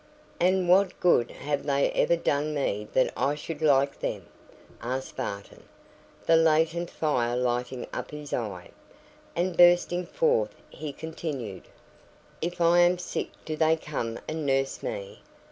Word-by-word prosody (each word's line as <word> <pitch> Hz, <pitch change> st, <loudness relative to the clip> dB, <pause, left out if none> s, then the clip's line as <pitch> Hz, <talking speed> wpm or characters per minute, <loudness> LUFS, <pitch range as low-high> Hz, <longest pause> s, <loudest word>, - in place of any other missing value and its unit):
"And 185 Hz, +1 st, +2 dB
what 190 Hz, +1 st, +4 dB
good 145 Hz, -9 st, +3 dB
have 145 Hz, 0 st, -3 dB
they 140 Hz, -1 st, +1 dB
ever 170 Hz, -, +3 dB
done 150 Hz, -2 st, 0 dB
me 105 Hz, -7 st, -1 dB
that 130 Hz, -, +2 dB
I 145 Hz, +2 st, +1 dB
should 150 Hz, +1 st, -7 dB
like 140 Hz, -2 st, +3 dB
them?" -, -, -3 dB, 0.6 s
asked 130 Hz, +2 st, -4 dB
Barton, 100 Hz, -6 st, -6 dB, 0.6 s
the 165 Hz, -, +5 dB
latent 165 Hz, +1 st, +3 dB
fire 125 Hz, -6 st, 0 dB
lighting 125 Hz, 0 st, -1 dB
up -, -, -4 dB
his 150 Hz, -1 st, -8 dB
eye: 100 Hz, -7 st, -4 dB, 0.6 s
and 175 Hz, +1 st, 0 dB
bursting 175 Hz, 0 st, +5 dB
forth, -, -, +1 dB, 0.2 s
he 155 Hz, -2 st, -6 dB
continued, 140 Hz, -, -6 dB, 0.7 s
"If 175 Hz, +2 st, -3 dB
I 170 Hz, +1 st, +5 dB
am 175 Hz, +1 st, +5 dB
sick, 180 Hz, -, -4 dB, 0.2 s
do 155 Hz, -, -3 dB
they 160 Hz, +1 st, +3 dB
come 120 Hz, -8 st, -4 dB
and 155 Hz, 0 st, -3 dB
nurse 135 Hz, -1 st, 0 dB
me? 100 Hz, -1 st, -6 dB
150 Hz, 145 wpm, -27 LUFS, 130-170 Hz, 0.7 s, the